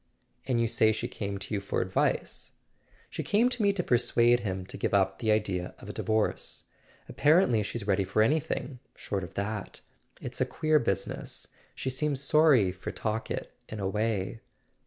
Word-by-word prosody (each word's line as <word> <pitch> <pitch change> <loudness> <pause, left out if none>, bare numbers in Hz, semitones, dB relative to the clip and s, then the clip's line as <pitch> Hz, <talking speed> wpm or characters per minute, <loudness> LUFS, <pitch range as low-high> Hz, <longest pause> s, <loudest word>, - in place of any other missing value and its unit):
"And 125 -3 +1
you 115 - +2
say 110 0 +4
she 110 - -2
came 100 -1 -4
to 95 +2 -7
you 100 - 0
for 100 - -2
advice?" 95 - -1 0.6
"She - - -3
came 230 +5 +3
to 245 -2 -3
me 200 -1 +4
to 185 -3 -1
persuade 120 -1 +3
him 95 -5 -3
to - - -8
give - - 0
up 95 -1 +2
the 110 -2 +1
idea 95 -4 -1
of - - -11
a - - -5
divorce. 110 -1 -1 0.4
Apparently 145 - +4
she's 105 +1 -4
ready 100 -1 +2
for 100 +3 +2
anything 140 0 -1 0.2
short 100 -2 -3
of 85 - -9
that. 105 0 -4 0.4
It's - - -5
a - - +4
queer 155 -1 +2
business. 100 -7 -2 0.3
She 130 - -2
seems 140 +1 -1
sorry 140 - +4
for 90 +1 -6
Talkett 110 +1 -3 0.2
in 110 - -6
a 95 - -1
way." 105 +1 -1
110 Hz, 180 wpm, -29 LUFS, 100-130 Hz, 0.6 s, say